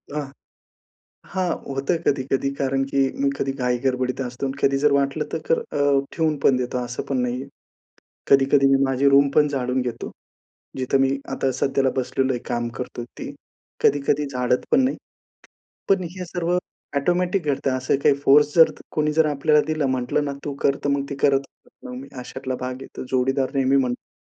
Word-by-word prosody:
आं. 145 -2 -4 1.0
हां, 185 -2 0 0.3
होतं 140 +6 0
कधी-कधी. 135 0 +1
कारण 135 -1 0
की 140 - +1 0.2
मी 140 - +3
कधी 135 - -1
घाईगडबडीत 125 0 -1
असतो 125 +1 -3
आणि 135 - -4
कधी 135 0 +3
जर 150 0 +3
वाटलं 140 +2 +1
तर - - -1
कर 165 - +3
अ, 145 -1 +1
ठेवून 160 -2 0
पण 135 - +5
देतो, 125 0 -2
असं 120 +1 -5
पण 135 - 0
नाहीये. 125 +2 -3 0.8
कधी-कधी 135 0 +5
मी 135 - +3
माझी 135 +1 +2
रूमपण 140 +2 +4
झाडून 130 -2 -1
घेतो, 125 -1 -5 0.7
जिथं 130 +1 +1
मी 135 0 +3 0.2
आता 135 0 0
सध्याला 135 +1 +1
बसलेलो 130 +1 0
आहे, 120 - -3
काम 120 -1 -1
करतोय 120 -1 -5
ती, - - -5 0.5
कधी-कधी 145 +1 +2
झाडत 125 -2 0
पण 255 - +5
नाही. 260 - 0 0.9
पण 195 -2 +3
हे 180 -1 -5
सर्व 175 +1 -1 0.4
ऑटोमॅटिक 180 +4 0
घडतं, 135 -1 0
असं 130 +1 +1
काही 140 - +5
फोर्स 145 +2 +5
जर 160 -1 +7 0.2
कोणी 150 -1 0
जर 160 0 +4
आपल्याला 150 +1 +3
दिला, 155 -2 0
म्हटलं 130 +3 0
ना, 140 - -3
"तू 145 - -3
कर" 140 - +3
तर 145 - +1
मग 140 0 0
ती 140 - -4
करत 140 -1 +5 0.4
पण 255 - -8
नाही. 270 - -9
अशातला 130 +1 -5
भाग 130 0 -3
आहे - - -7
तो, - - -4
जोडीदार 130 +1 +1
नेहमी 135 0 +3
म्हणतो, 125 -2 -2
135 Hz, 180 wpm, -23 LUFS, 130-145 Hz, 1.0 s, जर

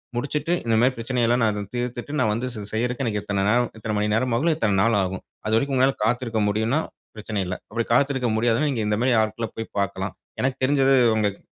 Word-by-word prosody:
முடிச்சுட்டு 145 +6 -1
இந்த 115 -1 +2
மாரி 130 +1 +3
பிரச்சனை 120 +1 -1
எல்லாம், 120 +1 +2
நான் 110 - +3
அத 105 0 -3
தீர்த்துட்டு, 125 +3 -4
நான் 110 -4 +2
வந்து 120 +3 -2
செ 105 - -5
செய்றதுக்கு, 125 +4 -1
எனக்கு 105 -2 -1
இத்தனை 100 -1 -1
நேரம் 120 +1 +2
இத்தன 110 -1 -3
மணி 105 0 0
நேரம் 120 +1 0
ஆகும். 160 +5 +2
இத்தனை 105 -8 +1
நாள் 115 0 +3
ஆகும். 95 0 -4 0.2
அது 110 - 0
வரைக்கும் 135 +3 0
உங்களால 135 +1 +3
காத்திருக்க 120 -1 0
முடியுன்னா, 110 +7 +1 0.4
பிரச்சனை 110 -1 -4
இல்ல. 90 +1 -3
அப்படி 115 -1 -2
காத்திருக்க 135 -1 +2
முடியாதுனா, 120 +6 +2
நீங்க 115 -4 -1
இந்த 105 0 +1
மாரி 130 0 +3
ஆட்கள 110 +1 -2
போய் 115 - -6
பாக்கலாம். 100 -2 -2 0.3
எனக்கு 130 0 0
தெரிஞ்சது, 135 0 +4 0.2
உங்களுக்கு 105 -2 -1
115 Hz, 215 wpm, -24 LUFS, 110-130 Hz, 0.4 s, தெரிஞ்சது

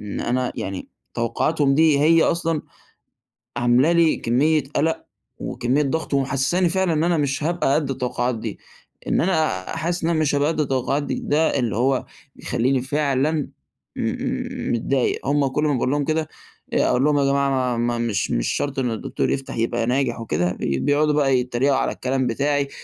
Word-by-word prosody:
إن 105 -1 -5
أنا 125 +1 -1
يعني 95 -1 -5 0.3
توقعاتهم 135 +5 +1
دي 155 -2 +4
هي 165 +2 +5
أصلًا 165 -2 0 0.9
عاملة 120 +7 +3
لي 170 -2 +4
كمية 150 +6 +2
قلق، 160 +2 0 0.3
وكمية 130 +5 -1
ضغط، 150 +1 -2
ومحسساني 140 +7 +1
فعلًا 190 -1 +1
إن 155 +1 +1
أنا 175 0 +2
مش 140 0 -1
هابقى 170 -4 +1
قد 145 -3 0
التوقعات 125 -1 -1
دي. 110 -2 -6 0.5
إن - - +2
أنا 155 - 0
حاسس 170 +2 -2
إن 170 0 +1
مش 155 -2 +1
هابقى 145 +1 +2
قد 160 -1 -1
التوقعات 135 0 0
دي، - - -3
ده 155 +2 +1
اللي 115 -5 -1
هو 130 +2 +1 0.3
مخليني 130 +2 0
فعلًا 145 +2 0 0.5
مم - - -3
متضايق. 125 +3 0
هم 140 0 +2
كل 150 +3 -1
ما 150 - +2
باقول 125 +1 0
لهم 145 0 0
كده 155 +1 -1 0.5
أقول 125 - +2
لهم: 150 -1 +3
"يا 140 - +2
جماعة 140 0 +2
ما 130 -2 0
ما 120 0 0
مش 110 -5 -1
مش - - 0
شرط 140 -1 -2
إنه 125 -3 0
الدكتور 110 - -2
يفتح 135 -3 -3
يبقى 115 0 0
ناجح 125 -2 0
وكده"، 90 -5 -1
بيقعدوا 145 - +1
بقى 135 -3 +3
يتريقوا 125 +2 +1
على 135 - 0
الكلام 130 0 -1
بتاعي، 140 +3 0
140 Hz, 170 wpm, -22 LUFS, 125-155 Hz, 0.9 s, هي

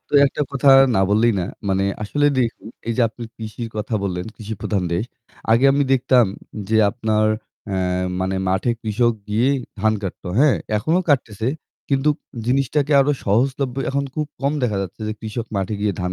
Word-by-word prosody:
তো - - -24
একটা 140 - -4
কথা 140 0 +1 0.3
না 95 - +3
বললেই 115 +3 +4
না। - - -1 0.2
মানে 95 0 +1 0.2
আসলে 145 +8 +1
দেখুন, 120 -3 -1 0.2
এই - - +1
যে - - +5
আপনি 115 +2 -11
কৃষির 115 +1 -6
কথা 105 +2 -3
বললেন, 90 -2 -2
কৃষি 110 0 -6
প্রধান 100 -3 -1
দেশ। 90 +6 0 0.5
আগে 115 +4 +4
আমি 140 +1 +2
দেখতাম 125 -3 +4 0.4
যে 110 - +2
আপনার 110 -2 +1 0.4
অ্যা 95 -2 -2 0.4
মানে 95 +1 -1
মাঠে 95 +6 +1
কৃষক 115 +2 +1 0.2
গিয়ে 115 +5 +2 0.3
ধান 110 +1 +3
কাটতো। 95 -2 -6
হ্যাঁ, 145 -1 +5 0.2
এখনও 160 - +1
কাটতেছে। 115 -5 +1 0.4
কিন্তু 140 +1 +2 0.4
জিনিসটাকে 140 +3 +1
আরো 145 +2 +3
সহজলভ্য 130 +5 +1
এখন 140 +1 0
খুব 150 -1 -1
কম 140 +1 +1
দেখা 110 -5 +1
যাচ্ছে 95 +3 -8
যে 110 - -1
কৃষক 110 +1 -4
মাঠে 95 +2 -1
গিয়ে 105 -1 +1
ধান 90 0 -2
115 Hz, 175 wpm, -21 LUFS, 105-135 Hz, 0.5 s, যে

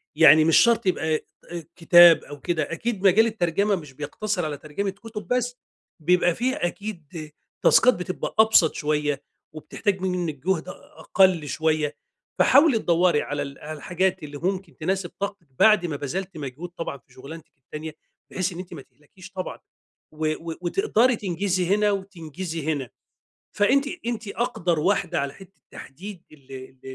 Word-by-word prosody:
يعني 160 0 +7
مش 165 - +5
شرط 235 -1 +4
يبقى 160 -4 +1
آآ، 170 +2 -8
كتاب 175 -1 +7
أو 145 0 -10
كده، 160 0 -2
أكيد 200 +3 -3
مجال 210 +4 +5
الترجمة 200 -1 0
مش 150 -7 -9
بيقتصر 180 +7 -3
على 150 -2 -4
ترجمة 155 +8 -4
كتب 210 +2 -9
بس. 245 0 -1 0.5
بيبقى 175 +1 +3
في 255 +2 0
أكيد 175 -5 -5 0.3
تاسكات 250 +2 +6
بتبقى 180 +1 -5
أبسط 220 -7 +5
شوية، 150 -2 -1 0.3
وبتحتاج 190 +5 -3
منِك 180 -4 -2
جهد 185 -4 0
أ - - -4 0.3
أقل 185 -6 +3
شوية. 155 -1 0 0.4
فحاولي 280 -6 +5
تدوري 170 -4 +2
على 145 0 -3
ال 140 -1 -7
على 155 +1 -7
الحاجات 180 +3 -1
اللي 145 -1 -7
ممكن 185 +2 -3
تناسب 185 +2 -2
طاقتِك 200 -5 -5
بعد 215 -5 +5
ما 160 -4 -3
بذلتِ 180 +6 -5
مجهود 145 +4 -7
طبعًا 165 -4 -4
في 125 0 -26
شغلانتِك 150 +5 -11
التانية، 150 +4 -8 0.4
بحيث 185 +1 -1
إن 170 - -8
أنتِ 180 0 -8
ما 155 - -8
تهلكيش 170 +8 -17
طبعًا 185 -2 -6 0.5
و 155 0 -2 0.2
و - - -5
وتقدري 250 - +2
تنجزي 185 -2 -1
هنا 210 0 +2
وتنجزي 180 -4 -5
هنا. 135 -5 -5 0.7
فأنتِ 265 +7 +3 0.2
أنتِ 230 -3 -3
اقدر 200 -7 -1
واحدة 180 0 +1
على 140 0 -3
حتة 195 0 -16
تحديد 180 +6 -10
ال 135 -3 -17
ال 130 0 -10
175 Hz, 155 wpm, -24 LUFS, 155-200 Hz, 0.7 s, يعني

